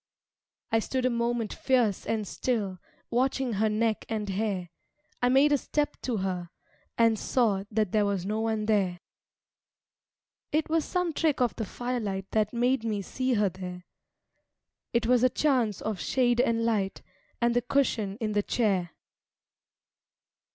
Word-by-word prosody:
I 225 - +4
stood 255 +3 -1
a 255 - +3
moment 235 -1 -1
fierce 245 -7 +1
and 220 -2 -1
still, 205 -7 -2 0.3
Watching 260 0 +1
her 215 +2 +2
neck 215 +1 0
and 215 -2 -2
hair. 195 -3 -2 0.5
I 245 - +3
made 275 +3 +5
a 290 - +4
step 295 +3 -1
to 245 -4 -1
her; 185 -3 -2 0.5
and 230 -2 +4
saw 210 -6 +1
That 215 -3 0
there 210 -2 +3
was 195 -3 -1
no 215 +2 -1
one 220 -1 0
there. 195 -5 +1 1.5
It 310 +1 +1
was 325 -2 +2
some 360 -2 -1
trick 310 -2 +1
of 245 -2 +1
the 220 - -3
firelight 215 -5 -3
That 215 -1 +1
made 245 0 +1
me 210 -3 -1
see 255 +4 -1
her 205 -2 +3
there. 180 0 -8 1.1
It 235 -1 +1
was 245 +1 +4
a 255 - +6
chance 250 - +1
of 215 -4 -3
shade 245 +1 +2
and 230 -2 +1
light 205 -4 0 0.4
And 235 0 +2
the 245 - +3
cushion 230 -6 0
in 220 -3 -1
the 205 0 +2
chair. 195 -6 0
225 Hz, 155 wpm, -28 LUFS, 205-250 Hz, 1.5 s, a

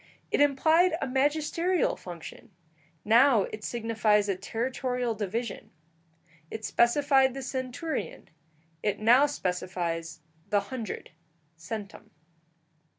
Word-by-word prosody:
It - - +2
implied 320 +5 +4
a - - -1
magisterial 305 +6 +1
function; 175 -3 -10 0.6
now 235 0 +5
it 215 +2 -7
signifies 220 -3 +1
a 195 - 0
territorial 245 +4 -2
division: 220 +2 -4 0.8
it 220 0 -6
specified 265 +1 +3
the 270 - -5
centurion; 260 +5 -4 0.5
it 210 -2 0
now 245 +7 +5
specifies 175 - -3 0.3
the 200 +1 0
hundred 230 -6 -5 0.4
(centum). 205 +4 -8
235 Hz, 95 wpm, -28 LUFS, 205-270 Hz, 0.8 s, now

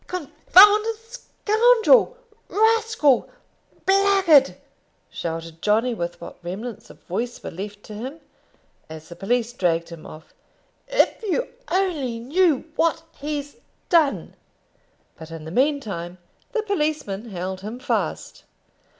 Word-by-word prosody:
"Con 360 -6 -5 0.2
founded 420 +4 +7
scoundrel, 475 +1 +2 0.3
rascal, 440 - +2 0.6
blackguard!" 385 -7 +4 0.6
shouted 165 -1 -6
Johnny, 225 +4 +2
with 175 -5 -5
what 170 - -10
remnants 200 +6 -7
of - - -16
voice 235 +7 -4
were - - -6
left 205 +3 -8
to 215 - -10
him, 260 +9 -7 0.7
as 160 0 -10
the 170 - -9
police 235 +4 -1
dragged 170 -6 0
him 170 -2 -10
off. 155 +1 -13 0.5
"If - - +1
you 450 +4 -1 0.2
only 330 -11 0
knew 305 +4 +2
what 325 0 +1 0.2
he's 290 0 -5 0.3
done." 320 -6 +2 0.9
But 160 0 -10
in 165 -1 -9
the 160 - -7
meantime 210 - -1 0.3
the 450 -3 -1
policemen 300 - -2
held 185 0 -5
him 215 +4 -6
fast. 260 - -3
265 Hz, 120 wpm, -23 LUFS, -, 0.9 s, founded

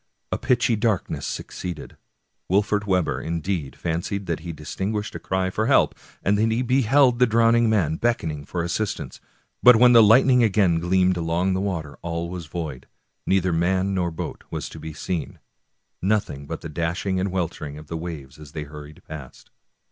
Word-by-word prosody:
A - - 0
pitchy 120 -1 +2
darkness 105 -3 -1
succeeded. 90 -1 -6 0.5
Wolfert 105 +2 +1
Webber, 90 -3 +1
indeed, 85 -3 -3
fancied 90 +4 -3
that 85 -2 -2
he 85 +1 -6
distinguished 95 +7 -4
a - - -6
cry 95 0 -1
for 110 +4 -1
help, 135 - +4 0.3
and 100 +1 +2
that 110 +1 +2
he 115 +3 +1
beheld 130 0 +3
the 125 - +5
drowning 115 +1 +4
man 85 -8 +1
beckoning 80 -11 -1
for 85 +3 -3
assistance; 90 +5 -3 0.4
but 125 -1 +9
when 125 +2 +6
the 115 - +9
light 110 +5 +7
ning 125 -2 +5
again 100 -7 +3
gleamed 90 +1 +2
along 85 +3 0
the 95 - 0
water 85 -7 -4
all 85 0 -3
was 90 -3 -6
void; 75 -6 -6 0.4
neither 95 -2 +2
man 95 +3 +1
nor 90 -2 0
boat 80 - -6
was - - -4
to - - -10
be 80 - -7
seen, 85 +2 -4 0.4
— - - -50 0.2
nothing 95 -8 -1
but - - -5
the - - -6
dashing 85 +4 -1
and 95 +1 -1
weltering 80 -5 -3
of 75 - -10
the 85 - -6
waves 75 -4 -7
as 75 -2 -12
they 75 - -4
hurried 75 0 -11
past. 75 -5 -10
90 Hz, 180 wpm, -24 LUFS, 80-105 Hz, 0.5 s, but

